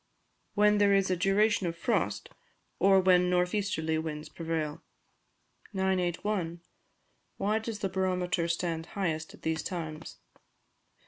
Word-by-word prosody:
_ - - -45 0.5
When 210 0 +4
there 200 -1 +5
is 195 -1 +2
a - - +3
duration 195 +2 +2
of 170 0 -4
frost, - - -1 0.5
or 195 0 +6
when 180 -1 +4
north 180 0 +2
easterly 160 -6 0
winds 155 -1 -5
prevail. 160 -3 -3 0.9
981. 185 -2 -1 0.8
_Why 210 +3 +1
does 220 -1 -4
the 195 - +1
Barometer 180 -2 0
stand 165 -1 -2
highest 160 -5 -2
at - - -23
these 160 0 0
Times? 160 -3 -6
180 Hz, 130 wpm, -30 LUFS, 165-195 Hz, 0.9 s, or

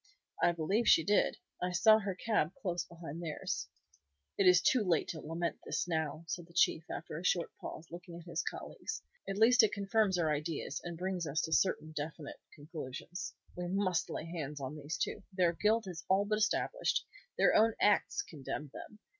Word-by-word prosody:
"I - - +5
believe 180 +8 0
she 160 - +7
did. 205 +3 +2 0.2
I 180 0 -1
saw 215 +5 +6
her 200 -3 -3
cab 185 -4 0
close 175 -4 -1
behind 165 -1 -8
theirs." 150 - -3 0.7
"It 195 - +3
is 180 0 +8
too 235 +6 +3
late 175 -5 +2
to 160 - -4
lament 165 +2 -3
this - - -2
now," 160 -1 -2
said 175 0 -4
the 170 - -20
Chief, 165 -2 +4
after 155 - -5
a - - -9
short 175 -2 +1
pause, 160 - -7
looking 175 0 -8
at 170 - -11
his 170 -1 -2
colleagues. 440 - -5 0.3
"At 195 - -2
least 245 +3 +7
it 215 -2 +3
confirms 200 -1 +2
our 160 -3 +2
ideas, 150 -1 -3
and 170 -1 -5
brings 180 -1 -2
us 145 +2 0
to 160 - -2
certain 155 -3 +2
definite 155 -1 -6 0.2
conclusions. 150 +3 -7 0.2
We 180 0 -3
must 185 -2 0
lay - - -4
hands 150 -4 -5
on 135 +2 -5
these 150 +1 -4
two. - - -2
Their 180 -2 +3
guilt 215 +5 +2
is 180 -2 -6
all 195 +2 +4
but 215 +1 0
established. - - +1 0.3
Their - - +5
own 225 +1 +5
acts 205 -1 +3
condemn 145 -1 -6
them. 210 - -9
175 Hz, 190 wpm, -33 LUFS, 160-195 Hz, 0.7 s, is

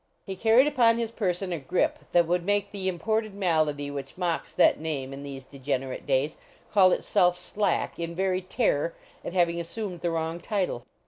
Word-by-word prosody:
He 190 - -5
carried 225 +6 +5
upon 235 -6 +4
his 230 -1 -2
person 185 -4 -1
a 170 - -3
grip 145 +6 0
that 175 -1 +5
would 175 +1 0
make 205 +1 0
the 195 -2 -4
imported 215 +4 -1
malady 155 -6 0
which 140 +1 -7
mocks 175 -3 -1
that - - +4
name 140 -4 -3
in 135 - -7
these 140 -2 -7
degenerate 135 -1 -4
days, 140 +3 +1 0.3
call 190 -3 +6
itself 180 0 +2
Slack, 200 -1 -1
in 170 0 -4
very 185 0 0
terror 180 - 0 0.3
at - - -5
having 170 -2 +2
as 170 - -4
sumed 190 -4 -5
the 175 - 0
wrong 165 0 -2
title. 180 - -2
175 Hz, 185 wpm, -27 LUFS, 150-195 Hz, 0.3 s, call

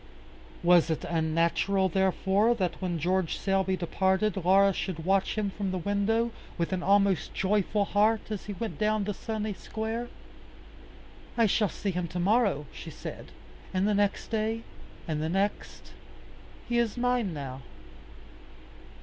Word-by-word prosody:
Was 175 -1 +5
it 160 - -1
unnatural, 170 +4 +1
therefore, 190 +4 +2
that 185 -4 -2
when 180 -2 -1
George 180 +2 0
Selby 190 -1 +1
departed, 190 +4 +1
Laura 195 +2 +4
should 165 -3 -4
watch 195 +1 +2
him 205 -2 0
from 200 0 -3
the 185 - -2
window, 205 +5 +1 0.3
with 170 +2 -1
an 185 - -1
almost 195 -3 +2
joyful 200 +2 +1
heart 215 +2 +1
as 210 - -4
he 205 - -3
went 220 +3 -5
down 215 -1 +1
the 205 +1 -2
sunny 215 +1 -3
square? 225 +4 -4 1.3
"I 230 - +5
shall 210 0 +2
see 200 - -3
him 180 -1 -2
to 180 +2 -5
morrow," 200 - +2
she - - -8
said, - - -8 0.4
"and 185 +2 +2
the 210 - +2
next 205 0 0
day, 225 +1 -1 0.4
and 155 -2 -1
the 160 - -1
next. 195 +4 -2 0.7
He 240 0 +1
is 235 0 0
mine 245 -4 +1
now." 135 -4 -6
195 Hz, 150 wpm, -28 LUFS, 180-215 Hz, 1.3 s, Was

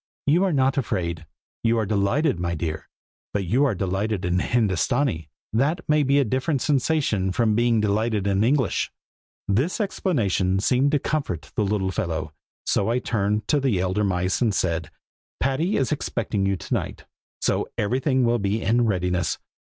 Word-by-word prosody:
"You 165 +6 +3
are 190 - +1
not 135 -2 +2
afraid. 85 - -3 0.4
You 115 0 +3
are 110 - +1
delighted, 100 - +1
my 85 0 -1
dear, 80 0 -4 0.5
but 100 -2 0
you 125 +11 +3
are 125 -7 +1
delighted 95 +1 -1
in 90 +1 +1
Hindostanee, 110 - 0 0.2
and 115 - +2
that 160 +5 -1
may 150 0 +3
be 140 0 +3
a 140 - +3
different 130 +4 0
sensation 135 -9 +1
from 110 +2 +2
being 120 0 +3
delighted 105 0 0
in 100 +1 +2
English." 130 -1 +1 0.6
This 130 - +1
explanation 105 - 0
seemed 130 +7 +2
to - - +5
comfort 135 - -3
the 105 - +1
little 100 -2 0
fellow, 80 -7 -3 0.3
so 100 - +1
I 120 - +2
turned 105 -3 -1
to 150 - +3
the 130 -9 +1
elder 95 +3 0
mice 95 +1 0
and 110 -5 +2
said, 85 -4 -1 0.5
"Patty 145 +9 +1
is 135 - 0
expecting 110 -8 -1
you 100 - +1
to - - -6
night, - - -3 0.3
so - - 0
everything 130 +4 +1
will 120 0 +2
be 100 +2 0
in 115 +3 +2
readiness. 90 -4 0
110 Hz, 170 wpm, -24 LUFS, 95-130 Hz, 0.6 s, to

